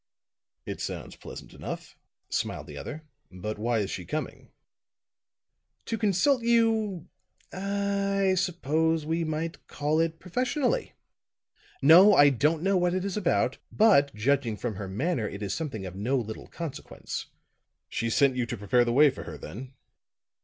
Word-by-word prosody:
"It - - -5
sounds - - -5
pleasant - - -10
enough," - - -7 0.3
smiled - - -2
the - - -10
other. 155 +2 -7 0.3
"But 105 +3 -5
why 115 +2 +1
is 100 - -3
she 90 - -4
coming?" - - -5 1.4
"To 230 - -2
consult 225 +5 +2
you 225 -5 +2 0.5
ah 200 +1 -1
I 190 -1 +3
suppose 160 -3 0
we 165 +2 0
might 160 +1 -4
call 150 +2 0
it 165 0 0
professionally. 255 - -1 0.9
No, 180 +8 +8
I 145 -2 +7
don't 150 +5 +1
know 195 0 +3
what 180 0 +1
it 185 +1 -1
is 200 - -2
about; 185 -5 +1
but 185 -11 +5
judging 120 0 +1
from 110 -4 -4
her 100 0 -5
manner, 115 - -1
it 100 +1 -7
is 100 - -2
something 130 -12 -4
of 90 0 -7
no 120 +8 0
little 110 -3 -5
consequence." 160 -5 -6 0.6
"She 115 - -2
sent 130 +3 +3
you 125 -2 -1
to 120 - -4
prepare 105 +5 +3
the 120 - 0
way 145 +2 +6
for - - -9
her, 80 -3 -7
then?" 120 - -9
155 Hz, 155 wpm, -28 LUFS, 120-190 Hz, 1.4 s, No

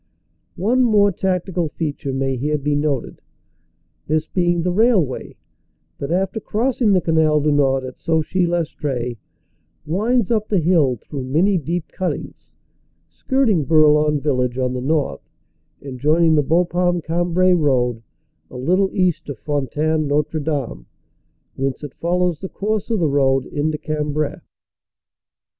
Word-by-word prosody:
One 230 +8 +1
more 205 -4 +4
tactical 180 -2 -1
feature 145 -3 -4
may 135 0 -1
here 150 +4 -1
be 145 +1 -1
noted, 145 -3 -2 0.9
this 155 +1 0
being 175 -1 0
the 180 - 0
railway 195 - +1 0.6
that 140 - -4
after 190 +4 0
crossing 230 +1 0
the 185 - +3
Canal 160 -2 +2
du 150 +1 +1
Nord 135 -2 +2
at 130 -1 -8
Sauchy 165 +3 0
Lestree, 145 -8 -2 0.7
winds 220 +7 0
up 215 -2 +1
the 205 - +1
hill 160 -6 +3
through 130 +3 -7
many 170 +10 +2
deep 165 +2 -3
cuttings, 185 - -5 0.6
skirting 250 - +1
Bourlon 150 -1 +4
village 125 -4 -1
on 125 -1 0
the 125 - -3
north 145 - -1 0.5
and 130 -3 -7
joining 160 +4 +3
the 150 - +4
Bapaume 175 +3 +1
Cambrai 175 +2 +2
road 125 -8 +1 0.5
a - - -9
little 185 +9 +1
east 180 -6 0
of 140 - -5
Fontaine 150 +3 -1
Notre 150 +2 0
Dame, 140 - -3 0.7
whence 135 +2 -3
it 145 -2 -7
follows 175 -1 0
the 190 - -6
course 210 +1 -2
of 225 - +1
the 170 -5 +1
road 135 -2 +2
into 150 +1 -2
Cambrai. 150 -1 -2
155 Hz, 140 wpm, -20 LUFS, 140-180 Hz, 0.9 s, more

